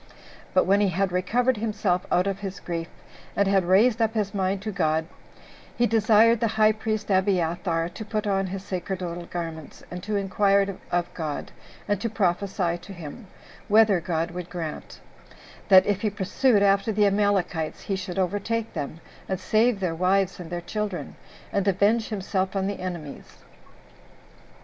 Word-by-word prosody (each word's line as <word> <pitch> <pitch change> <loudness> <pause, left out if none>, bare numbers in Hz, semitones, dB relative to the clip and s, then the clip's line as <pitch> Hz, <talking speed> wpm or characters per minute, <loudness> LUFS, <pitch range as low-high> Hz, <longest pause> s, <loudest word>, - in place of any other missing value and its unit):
But 185 - +5
when 200 +2 +3
he 205 - +3
had 190 +1 0
recovered 235 +8 +1
himself 210 -4 -1
out 180 - +3
of 195 -1 -2
his 195 -1 -6
grief, 165 -1 -4 0.5
and 200 - +2
had 195 -2 +3
raised 215 +6 +4
up 225 0 +1
his 205 -2 -1
mind 195 0 -1
to 215 - -3
God, 160 -4 +1 0.7
he 240 - +4
desired 225 +1 +4
the 230 - +2
high 215 0 +6
priest 215 -1 -3
Abiathar 175 -3 +1
to 195 +5 -8
put 215 0 -2
on 195 -1 +1
his 190 +1 -5
sacerdotal 180 -2 -4
garments, 165 -3 -6
and 180 0 -5
to 210 +3 -3
inquire 200 0 +2
of 175 0 -1
God, 155 -4 -4 0.4
and 205 -2 0
to 230 - -1
prophesy 185 -3 0
to 190 +3 -11
him, 175 +5 -9 0.4
whether 215 -3 +5
God 165 0 -1
would 180 0 -6
grant; 165 -3 -6 0.7
that 190 -1 +8
if 205 -1 0
he 215 - +1
pursued 205 +3 +2
after 200 +2 +3
the 210 0 +3
Amalekites, 195 -5 0
he 195 - -2
should 185 -1 -5
overtake 205 +4 -1
them, 150 +3 -5 0.3
and 190 -1 -1
save 220 +3 +2
their 180 -4 -1
wives 185 +2 +1
and 175 -2 -8
their 175 0 -4
children, 205 0 -4 0.4
and 200 0 0
avenge 205 +4 +2
himself 195 -2 -2
on 195 -1 0
the 200 0 -3
enemies. 170 -6 -7
195 Hz, 165 wpm, -25 LUFS, 180-210 Hz, 0.7 s, that